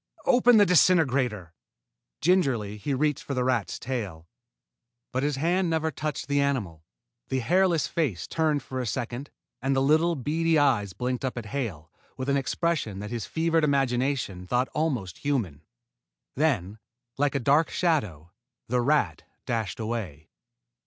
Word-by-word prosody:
"Open 245 -2 +5
the 205 - +7
disintegrator." 135 - +3 0.7
Gingerly 130 - +1
he 135 +6 -2
reached 150 +1 0
for 140 - -4
the 125 - +1
rat's 125 -4 0
tail. 100 -11 -5 0.8
But 130 - -1
his 145 0 0
hand 175 +5 +1
never 160 -1 0
touched 150 0 -4
the 140 0 +2
animal. 105 - -2 0.4
The 130 - -1
hairless 175 +5 +2
face 140 - -1
turned 155 -4 0
for 130 - -5
a 125 - -2
second, 120 +4 -4 0.3
and 135 +1 +1
the - - +3
little, 155 +5 +3
beady 160 +4 +1
eyes 120 -10 +2
blinked 125 +3 -3
up 130 -2 -2
at 120 - -4
Hale 90 - -4 0.3
with 130 +1 -3
an 140 - +3
expression 140 - -1
that 105 +1 -6
his 115 -3 -4
fevered 165 0 +1
imagination 130 -8 0
thought 125 +5 +1
almost 125 - -2
human. 115 - -2 0.7
Then, 110 - 0 0.4
like 145 -1 +1
a - - +2
dark 145 +6 +3
shadow, 105 - -1 0.4
the 125 +1 +1
rat 120 - +1 0.2
dashed 115 -4 -2
away. 110 -10 -5
130 Hz, 150 wpm, -26 LUFS, 110-155 Hz, 0.8 s, the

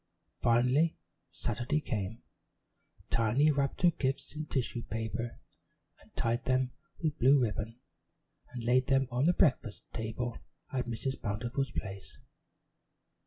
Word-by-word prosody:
Finally 125 +7 +3 0.3
Saturday 130 +5 -1
came. 110 -6 -3 0.9
Tiny 120 +7 +4
wrapped 140 +4 -1
her 175 - +7
gifts 135 -3 -2
in 155 0 -4
tissue 125 -3 -1
paper 115 +1 -4 0.6
and - - -23
tied 120 +2 0
them 130 0 +2 0.3
with 155 -2 0
blue 135 +3 +6
ribbon, 115 0 -2 0.7
and 120 -2 -6
laid 125 +2 +3
them 135 -1 +3
on 125 +3 +2
the 175 - +5
breakfast 130 - +2
table 115 +1 -3 0.3
at 130 -2 -1
Mrs. 130 +3 -3
Bountiful's 120 +6 -1
place. 100 -5 -6
125 Hz, 120 wpm, -32 LUFS, 115-135 Hz, 0.9 s, her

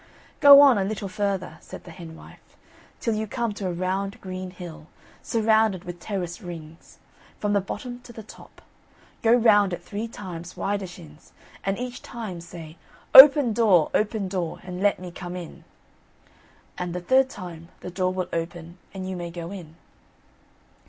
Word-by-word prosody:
"Go 285 0 +10
on 270 -7 +6
a - - +1
little 200 0 -3
further," 195 -1 -3
said - - -11
the 175 - -11
hen 165 -1 -10
wife, - - -17 0.4
"till 230 - -1
you 215 0 -2
come 230 +1 -2
to 200 -2 -4
a - - -1
round 190 +5 -3
green 185 -1 -6
hill, 170 -4 -10 0.3
surrounded 220 -4 +2
with 175 0 -8
terrace 175 -2 -5
rings, 165 -2 -10 0.4
from 205 -1 -1
the 200 - +3
bottom 245 +6 -6
to 245 -1 -14
the 225 -1 -10
top; - - -16 0.6
go 225 - +3
round 210 -5 +5
it - - -6
three 215 +3 -5
times, 180 -5 -8
widershins, 180 -6 -6 0.3
and 195 0 -1
each 250 0 -6
time 215 -8 -7
say: 165 -1 -11 0.4
Open, 275 -3 +10
door! 205 -8 +4
open, 210 -2 0
door! 180 -3 -3
And 180 0 -7
let 205 0 +3
me 180 -1 -9
come 175 0 -7
in. 175 -3 -9 1.1
and 180 -1 -4
the 180 - -3
third 260 +8 +3
time 175 -7 -9
the 180 - -7
door 185 0 0
will 185 -1 -3
open, 170 +1 -5 0.2
and 185 -1 -5
you 190 - -4
may 175 -1 -5
go 170 +1 -7
in." 170 -5 -9
185 Hz, 170 wpm, -25 LUFS, 175-215 Hz, 1.1 s, Go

